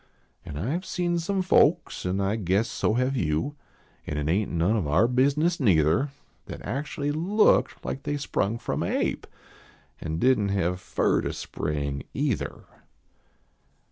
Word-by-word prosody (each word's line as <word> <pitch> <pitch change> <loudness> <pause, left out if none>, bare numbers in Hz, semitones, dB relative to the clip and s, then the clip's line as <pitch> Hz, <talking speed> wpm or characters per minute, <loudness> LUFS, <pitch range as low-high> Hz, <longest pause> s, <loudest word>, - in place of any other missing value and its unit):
An 75 - -7
I 115 - -1
ve - - -15
seen 175 -2 -1
some 190 +3 -1
folks, 175 - +3
an 90 +2 0
I 100 +2 +1
guess 100 +2 +1
so 110 -1 0
have 130 +2 +1
you, 80 - -1 0.5
An 75 - -3
it 75 0 -1
ain 100 +4 +1
t - - -5
none 85 +7 +2
of 95 -9 0
our 90 +10 +4
bizness 140 +7 +2
neither, 85 - +3 0.4
That - - -8
actually 145 +4 -2
looked 185 +8 +2
like 135 - -3
they 145 - -2
sprung 115 -6 -1
from - - -3
a - - 0
ape, - - -1 0.7
An 80 0 -3
didn 115 0 +3
t 100 - -1
have 90 -1 0
fur - - +1
to - - -3
spring 70 -2 -3
either. - - -2
110 Hz, 165 wpm, -26 LUFS, 85-145 Hz, 0.7 s, our